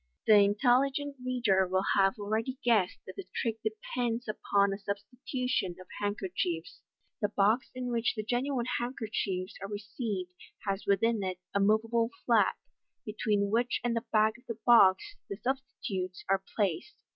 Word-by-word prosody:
The 220 - +6
intelligent 260 +7 +2
reader 230 -7 +2
will 190 +1 0
have 195 +2 +3
already 220 +5 -2
guessed 215 -7 +3
that - - -10
the 390 - -7
trick 225 -2 -1
depends 230 +2 -2
upon 200 -2 +1
a 195 - -5
substitution 210 0 -3
of 185 - -11 0.2
handkerchiefs. 185 -4 -2 0.4
The 205 - +1
box 210 +5 +2
in 250 -1 -3
which 235 0 0
the 215 - -3
genuine 245 +2 -1
handkerchiefs 215 -6 -3
are 195 - -5
received 205 -2 -4 0.4
has 195 0 -2
within 210 +3 +2
it 185 -2 -2 0.2
a 200 - +2
moveable 225 +3 +2 0.2
flap, - - +3 0.5
between 210 -2 0
which 240 +2 +1
and 240 -1 0
the 230 - -2
back 215 +2 +3
of - - -26
the 230 - -4
box 235 - +5
the 200 - -3
substitutes 220 -7 -4
are 195 0 +2
placed. 200 - -1
215 Hz, 150 wpm, -30 LUFS, 195-245 Hz, 0.5 s, The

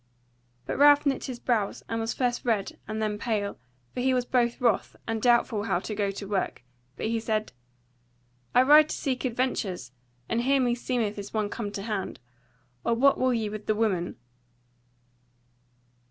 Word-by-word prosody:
But - - -3
Ralph 290 +1 +7
knit 275 -2 0
his 255 -3 -6
brows, 220 -6 -1
and 225 - -2
was 225 0 -1
first 245 -2 -1
red 220 -5 -1
and 215 0 -3
then 210 -1 -1
pale; 210 -4 -2 0.3
for - - -4
he 260 +1 +2
was 250 -1 0
both 240 -2 +1
wroth, 235 -5 +1
and 225 -1 -2
doubtful 235 -3 +3
how 190 - +1
to 205 +4 -4
go 205 -1 0
to 200 0 -6
work; 195 -10 -2 0.3
but - - -3
he 225 +1 0
said: 215 - -2 1.0
"I 250 - +7
ride 300 +3 +7
to - - -2
seek 265 -2 -2
adventures; 225 - -2 0.4
and 230 - 0
here 275 +2 +3
meseemeth 240 -4 0
is 200 +2 -8
one 210 -1 0
come 205 -1 -4
to 195 - -4
hand. 210 -3 -3 0.6
Or 235 - +2
what 275 +4 +4
will 255 0 +3
ye 225 -3 0
with 210 0 -7
the 215 - +2
woman?" 195 -6 0
225 Hz, 175 wpm, -27 LUFS, 210-250 Hz, 1.0 s, Ralph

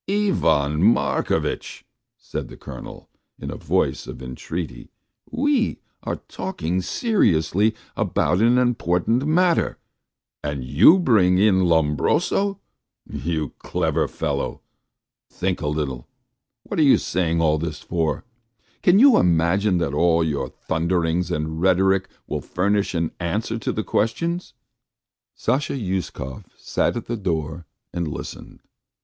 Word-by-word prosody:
"Ivan 80 - +2
Markovitch," 110 +5 0 0.3
said - - -6
the - - -12
Colonel, - - -10 0.3
in - - -6
a - - -5
voice - - -1
of - - -8
entreaty, 70 +6 -6 0.4
"we 265 -1 +1 0.2
are - - -3
talking 95 - -3
seriously 105 - +1 0.2
about 90 - +1
an 120 +2 +4
important 120 - +1
matter, 170 +2 +2 0.7
and 75 -3 -3
you 75 - +6
bring 105 - +4
in 95 -2 +4
Lombroso, 85 - +1 0.5
you 80 -2 -3
clever - - 0
fellow. - - -3 0.7
Think 95 0 -2
a 75 - -2
little, 70 -5 -3 0.6
what - - -4
are - - +5
you 145 -3 +6
saying 85 -2 0
all 80 -2 +2
this 75 -3 -4
for? 80 -3 -2 0.6
Can 180 +2 +5
you 260 +2 +7
imagine 90 +3 +2
that 80 -5 -1
all 85 +2 +3
your 70 -5 -2
thunderings 85 +3 -1
and 80 +1 -3
rhetoric 95 +1 +3 0.2
will - - -3
furnish 100 +1 0
an 85 -1 0
answer 105 +6 -2
to - - -2
the 110 - -2
question?" 170 +15 0 0.9
Sasha 140 +3 0
Uskov 95 - -4
sat - - -1
at 115 - -5
the 120 - -3
door 80 -4 -3 0.3
and 85 -2 -2
listened. 75 - -8
90 Hz, 125 wpm, -23 LUFS, 80-115 Hz, 0.9 s, you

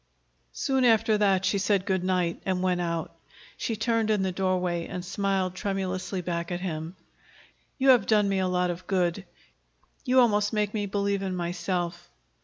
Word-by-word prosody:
Soon 265 - 0
after 225 -2 +4
that 195 -2 +2
she 200 - +1
said 200 -1 +1
good 190 -2 0
night 180 -2 0
and 185 -1 -1
went 180 -1 +1
out. 170 -1 -3 0.4
She 230 - -3
turned 230 -1 0
in 210 -3 +2
the 190 - 0
doorway 180 -2 -1
and 180 0 -6
smiled 190 -1 -1
tremulously 190 -1 -3
back 170 0 -3
at 175 - -2
him. 165 -1 -4 0.8
"You 270 0 +3
have 250 -2 +6
done 210 -2 +4
me 195 -1 +1
a 185 - +1
lot 180 -1 +1
of 175 +1 -8
good. 185 0 0 0.8
You 255 -1 +3
almost 210 -4 +3
make 210 -1 0
me 205 -2 -1
believe 200 0 -1
in 190 -1 -2
myself." 175 0 -3
190 Hz, 175 wpm, -27 LUFS, 180-205 Hz, 0.8 s, have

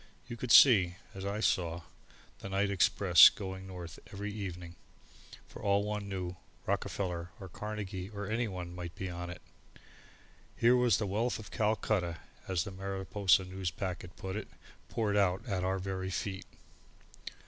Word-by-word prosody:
You 120 -1 -7
could 120 0 -4
see, 95 -10 +8 0.2
as 95 0 -6
I 100 +2 -2
saw, 85 -5 0 0.6
the 95 - -7
night 100 +1 +1
express 95 -2 +7
going 95 -1 -7
north 90 -4 -8
every 100 +1 -5
evening; 90 -4 -6 0.7
for - - -11
all 100 0 +2
one 105 -1 -3
knew 90 -2 -4 0.3
Rockefeller 90 -3 -2
or 95 - -8
Carnegie 100 -1 -5
or 100 -1 -6
anyone 95 -5 -3
might 90 -1 -7
be 95 -1 -4
on 85 0 -5
it! 90 0 -9 1.1
Here 120 +2 +5
was 125 -5 +4
the 110 - -1
wealth 110 +5 0
of 110 -1 -10
Calcutta, 105 -5 0 0.3
as 90 -4 0
the 100 - -7
Mariposa 95 0 +1
Newspacket 90 -1 -4
put 95 0 -5
it, 110 - -4 0.4
poured 105 -3 0
out 95 0 +2
at 95 -4 -1
our 95 +1 0
very 95 0 -3
feet. 95 0 -4
95 Hz, 150 wpm, -32 LUFS, 90-105 Hz, 1.1 s, see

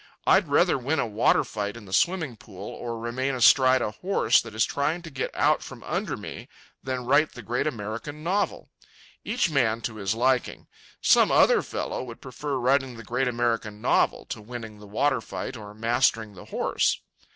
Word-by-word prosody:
I'd - - +4
rather - - +3
win 140 +6 -1
a 140 - +1
water 110 -1 +2
fight 105 +1 -4
in 115 - -11
the 95 - -10
swimming 160 - +1
pool, 100 -2 -10
or 115 -1 -5
remain 130 +4 -2
astride 130 +2 +5
a - - -2
horse 130 - +2
that 115 -2 -10
is 110 - +3
trying 155 +5 -1
to 165 - -9
get 130 -1 -3
out - - +3
from - - -10
under - - -2
me, - - -8 0.3
than 130 -2 -4
write 145 +4 +3
the 120 - -10
great 120 +7 -1
American 120 +5 -5
novel. 195 +5 -1 0.5
Each 215 -5 0
man 115 -6 +2
to 110 -1 -4
his 100 +1 -1
liking. 125 +1 0 0.4
Some - - +5
other - - +5
fellow - - -4
would 120 -2 -9
prefer 135 +2 -5
writing 130 0 +1
the 115 - -9
great 125 +4 -1
American 115 -3 -1
novel - - +1
to - - -5
winning 110 -1 -8
the 105 - -12
water 130 +4 +1
fight 130 - -6
or 105 -3 -9
mastering 115 -1 +1
the 90 - -12
horse. - - 0
120 Hz, 185 wpm, -26 LUFS, 110-135 Hz, 0.5 s, astride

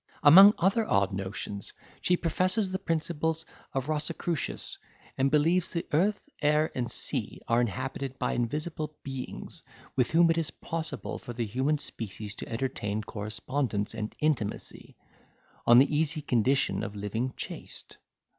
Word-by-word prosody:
Among 195 +8 +10
other 195 +6 +3
odd 100 0 +3
notions, 100 +1 -5 0.3
she 180 - +3
professes 185 +4 +1
the 190 - -1
principles 160 -2 -1 0.3
of 135 0 -2
Rosicrucius, 155 +1 -2 0.4
and 135 +1 +2
believes 165 +5 +3
the 170 - -3
earth, 200 - +2
air, 150 +1 +3
and 120 -2 -2
sea, - - -2
are 115 +1 +3
inhabited 130 +4 -3
by - - 0
invisible 150 +5 -2
beings, 135 -2 -6 0.3
with 125 -2 +2
whom 165 +1 +5
it 165 - +1
is 160 - -1
possible 160 -8 -4
for 120 - -7
the 120 0 -2
human 130 +8 +1
species 105 -6 -6
to - - -8
entertain 110 -3 -2
correspondence 105 +1 -2
and 110 -1 -5
intimacy, 145 -9 -1 0.7
on 120 - +9
the 140 +4 +5
easy 155 0 +1
condition 130 +1 +2
of 100 - -5
living 110 +5 -2
chaste. - - -7
140 Hz, 140 wpm, -29 LUFS, 115-160 Hz, 0.7 s, Among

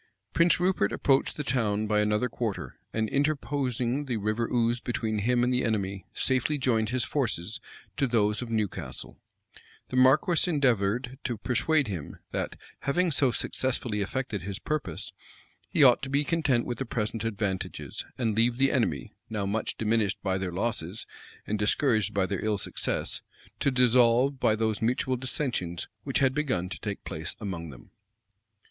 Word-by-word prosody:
Prince 170 +1 +4
Rupert 180 - +2
approached 135 -1 +2
the 150 - -2
town 110 -5 0
by 105 0 +2
another 105 +3 +2
quarter, 115 -3 -4 0.2
and, 110 0 0
interposing 140 -2 0
the 125 -4 -1
River 110 +3 -1
Ouse 120 0 +2
between 110 -3 -2
him 120 +3 +2
and 125 +1 +2
the 125 - +1
enemy, 100 -4 -1
safely 130 +3 +1
joined 115 -5 +1
his 125 +1 +1
forces 110 - -2 0.4
to 135 - +2
those 105 -2 +2
of 125 - -5
Newcastle. 95 - -3 0.7
The 130 - -2
marquis 150 +7 +4
endeavored 125 - +1
to 120 -4 -1
persuade 135 +6 +1
him, 90 -8 -5
that, - - -2 0.2
having 175 +5 +1
so 135 -2 +3
successfully 120 -3 -1
effected 110 -1 -2
his 100 +1 -4
purpose, 155 +6 -4 0.6
he 155 - +4
ought 125 -3 +7
to 135 - -4
be 140 +2 +2
content 145 -7 +1
with 120 - -4
the 135 - -1
present 110 -1 -2
advantages, 100 -4 -3
and 115 -4 0
leave 120 +2 +3
the 135 +1 +4
enemy, 75 - 0 0.2
now 105 -3 -2
much 105 +3 -2
diminished 110 -2 +1
by 95 0 0
their 95 -2 -2
losses, 100 0 -2 0.4
and 105 0 -2
discouraged 110 -1 +2
by 100 -2 +1
their 95 -1 -3
ill 110 -1 +1
success, - - -1 0.4
to - - +2
dissolve 125 +1 +4
by 110 - +3
those 110 -1 0
mutual 125 +3 +1
dissensions 125 - -2 0.2
which 135 - 0
had 135 -2 +3
begun 130 -12 -1
to - - -6
take 100 -2 -5
place 80 -1 -5
among 85 -6 -5
them. 60 -4 -13
115 Hz, 165 wpm, -28 LUFS, 105-130 Hz, 0.7 s, ought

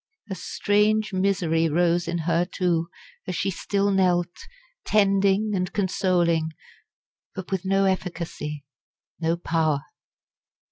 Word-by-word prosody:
A - - 0
strange 210 +3 +1
misery 180 -4 +1
rose 170 +2 +2
in 170 0 -1
her 170 0 +2
too, 175 -2 -1 0.4
as 185 - -3
she 195 - -1
still 200 +2 0
knelt, 180 -2 +2 0.5
tending 200 0 +2
and 180 -2 -1
consoling, 175 -4 +1 0.8
but 190 0 -7
with 190 -1 -2
no 195 +1 +2
efficacy 170 -6 -3 0.5
no 165 0 0
power. 160 -4 0
180 Hz, 110 wpm, -24 LUFS, 170-195 Hz, 0.8 s, rose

